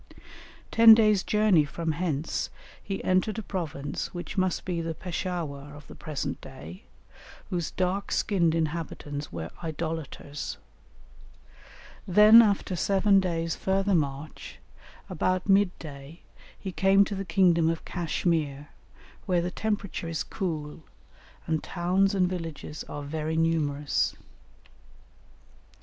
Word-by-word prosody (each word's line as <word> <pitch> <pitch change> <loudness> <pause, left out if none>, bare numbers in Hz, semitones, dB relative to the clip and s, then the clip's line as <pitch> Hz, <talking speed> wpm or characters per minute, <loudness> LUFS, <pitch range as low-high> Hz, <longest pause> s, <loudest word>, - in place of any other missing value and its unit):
Ten 225 -1 +9
days' 215 -3 +4
journey 210 -7 +3
from 160 +3 -3
hence 155 -2 -2 0.3
he 195 -1 -5
entered 185 +4 +1
a 220 - -3
province 160 -7 -4
which 175 - -6
must 185 -2 0
be 175 -2 -2
the 165 -1 -4
Peshawur 160 -6 -4
of 150 - -12
the - - -12
present 150 -3 -5
day, 80 +5 -11 0.7
whose 175 -3 -1
dark 185 +2 -2
skinned 170 -5 +2
inhabitants 150 -2 -3
were 85 -1 -6
idolaters; 155 -2 -5 1.5
then 210 +5 +9
after 200 -4 +1
seven 195 +3 +3
days' 165 -3 -1
further 195 +1 0
march, 145 -2 -3 0.5
about 185 +1 -1
mid 195 -1 +5
day 145 +1 -10 0.3
he 190 - -6
came 195 +2 +4
to 205 - -5
the 195 0 -3
kingdom 170 -3 +3
of 165 0 -3
Cashmere, 155 -4 -1 0.6
where 180 -3 +2
the 180 - -2
temperature 205 -4 -3
is 160 -4 -2
cool, 160 -5 -4 0.6
and 160 -1 0
towns 190 +3 +1
and 185 -2 +3
villages 165 -4 -5
are 145 - -6
very 155 +2 -3
numerous. 150 -3 +1
170 Hz, 120 wpm, -27 LUFS, 155-190 Hz, 1.5 s, Ten